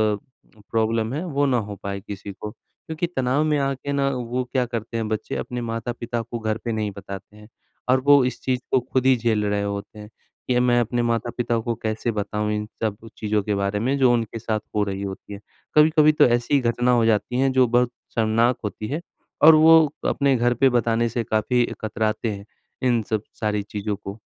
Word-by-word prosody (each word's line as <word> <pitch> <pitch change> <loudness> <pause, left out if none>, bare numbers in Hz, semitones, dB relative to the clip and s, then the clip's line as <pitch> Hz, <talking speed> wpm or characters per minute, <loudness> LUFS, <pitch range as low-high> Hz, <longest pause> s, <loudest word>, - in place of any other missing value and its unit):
अ, 110 0 -20
problem 115 +1 0
है 155 +5 -2
वो 145 -4 0
ना 130 -3 +2
हो 100 - -5
पाए 100 0 -3
किसी 100 0 -7
को। 105 +2 -7
क्योंकि, 160 +9 -6
तनाव 135 -2 0
में 155 -1 +1
आके 135 0 -2
ना 140 -1 +1
वो 125 0 -2
क्या 130 -2 +2
करते 115 -1 -4
हैं 110 -1 -2
बच्चे 110 0 -3
अपने 125 -1 -4
माता-पिता 115 +1 -3
को 115 +1 -6
घर 110 0 -1
पे 115 - -1
नहीं 110 -2 -2
बताते 100 +2 -9
हैं। 105 0 -14 0.4
और 130 +1 +5
वो 145 -2 +7
इस 125 - -3
चीज़ 130 -1 0
को 130 - +4
ख़ुद 130 +1 -2
ही 130 -1 +6
झेल 110 -3 +1
रहे 100 0 0
होते 100 +1 -5
हैं 105 0 -10 0.4
कि 125 -1 +2
मैं 120 -1 +3
अपने 120 +1 -1
माता-पिता 120 0 -1
को 115 +1 -2
कैसे 110 +2 -1
बताऊँ 105 0 -2
इन 105 0 -2 0.2
सब 105 -2 -1 0.2
चीज़ों 105 -1 0
के 105 0 -1
बारे 100 +1 -1
में 130 +6 0
जो 130 -2 +4
उनके 115 -1 -2
साथ 110 -1 -1 0.2
हो 105 - +3
रही 100 -1 -4
होती 100 +1 -7
है। 100 - -7 0.4
कभी-कभी 155 0 +6
तो 150 - +5
ऐसी 120 +4 +2
घटना 120 +1 +1
हो 120 -2 +3
जाती 115 +3 +1
है 135 0 +3
जो 130 - +6
बहुत 120 +1 +2 0.2
शर्मनाक 115 +2 +2
होती 105 0 -4
है। 150 +5 -3 0.4
और 160 +1 +10
वो 160 +1 +8 0.3
अपने 140 -2 +2
घर 120 +1 +2
पे 135 +3 +4
बताने 115 -1 +1
से 115 +1 -2
काफ़ी 120 +3 +1 0.2
कतराते 110 +1 -1
हैं 100 0 -7 0.4
इन 120 -2 +2
सब 110 -1 0 0.2
सारी 105 -2 0
चीज़ों 105 0 -4
को। 100 +1 -9
115 Hz, 210 wpm, -23 LUFS, 105-125 Hz, 0.4 s, और